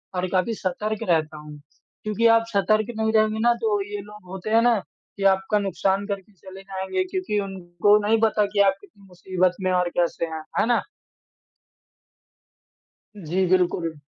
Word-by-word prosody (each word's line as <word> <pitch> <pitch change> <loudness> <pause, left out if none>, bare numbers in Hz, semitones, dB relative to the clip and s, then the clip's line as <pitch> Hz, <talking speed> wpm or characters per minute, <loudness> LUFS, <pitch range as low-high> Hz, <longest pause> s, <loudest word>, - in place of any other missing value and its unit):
और 180 0 -1
काफ़ी 190 +4 +1
सतर्क 210 +2 -3
रहता 155 -2 +1
हूँ, 150 0 -11 0.4
क्योंकि 215 +2 +2
आप 230 0 +4
सतर्क 215 +2 +2
नहीं 220 0 +1
रहेंगे 215 0 +2
ना 240 +1 +4
तो 210 -3 +1
ये 205 -1 -4
लोग 210 0 -13
होते 190 +2 -6
हैं 225 +1 +4
ना, 235 -2 +3 0.4
कि 200 - -4
आपका 195 +2 +3
नुकसान 195 0 0
करके 200 0 -5
चले 190 0 -12
जाएँगे 195 - -3
क्योंकि 370 - -2
उनको 195 +1 +1
नहीं 225 +1 +3
पता 215 -2 +3
कि 200 - 0
आप 195 -1 +5
कितनी 205 0 -19
मुसीबत 180 0 -1
में 185 0 0
और 180 -1 +1
कैसे 170 -1 0
हैं। 160 -1 -6 0.2
है - - +3
ना? 235 0 +2 2.4
जी, 185 0 -1
बिल्कुल। 175 -4 +1
195 Hz, 165 wpm, -24 LUFS, 185-215 Hz, 2.4 s, आप